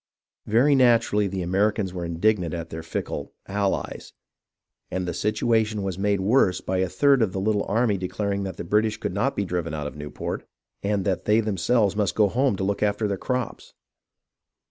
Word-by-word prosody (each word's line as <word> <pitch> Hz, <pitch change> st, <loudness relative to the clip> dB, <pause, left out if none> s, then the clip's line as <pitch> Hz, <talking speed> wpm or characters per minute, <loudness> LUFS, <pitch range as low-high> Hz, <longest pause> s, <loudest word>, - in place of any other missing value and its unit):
Very 120 Hz, +7 st, +4 dB
naturally 115 Hz, -5 st, +4 dB
the 95 Hz, -1 st, -3 dB
Americans 100 Hz, +1 st, +1 dB
were 90 Hz, -1 st, -4 dB
indignant 85 Hz, 0 st, +1 dB
at 85 Hz, -1 st, -6 dB
their 80 Hz, -, -5 dB
fickle 80 Hz, 0 st, -5 dB
"allies," 100 Hz, 0 st, -2 dB, 0.8 s
and 90 Hz, -1 st, -3 dB
the 90 Hz, -, -2 dB
situation 110 Hz, +1 st, +1 dB
was 95 Hz, -1 st, -3 dB
made 100 Hz, -1 st, +1 dB
worse 100 Hz, -2 st, +3 dB
by 95 Hz, 0 st, -2 dB
a 95 Hz, -1 st, +1 dB
third 135 Hz, +8 st, +3 dB
of 100 Hz, -5 st, +1 dB
the 95 Hz, -, -2 dB
little 105 Hz, +1 st, +1 dB
army 110 Hz, -1 st, +1 dB
declaring 100 Hz, +2 st, -2 dB
that 95 Hz, -3 st, -5 dB
the -, -, -4 dB
British 105 Hz, +4 st, +1 dB
could -, -, -4 dB
not 130 Hz, +8 st, 0 dB
be 100 Hz, -, -1 dB
driven 85 Hz, -3 st, -2 dB
out 75 Hz, -1 st, -4 dB
of 75 Hz, -, -6 dB
Newport, 75 Hz, 0 st, -5 dB, 0.4 s
and 100 Hz, -1 st, 0 dB
that 95 Hz, -3 st, -1 dB
they 105 Hz, +1 st, +4 dB
themselves 105 Hz, 0 st, +1 dB
must 105 Hz, -2 st, 0 dB
go 105 Hz, -2 st, +4 dB
home 130 Hz, +1 st, +1 dB
to 95 Hz, -, -3 dB
look 100 Hz, +1 st, -1 dB
after 105 Hz, +1 st, +1 dB
their 100 Hz, -, -1 dB
crops 125 Hz, +4 st, -4 dB
100 Hz, 190 wpm, -25 LUFS, 95-110 Hz, 0.8 s, Very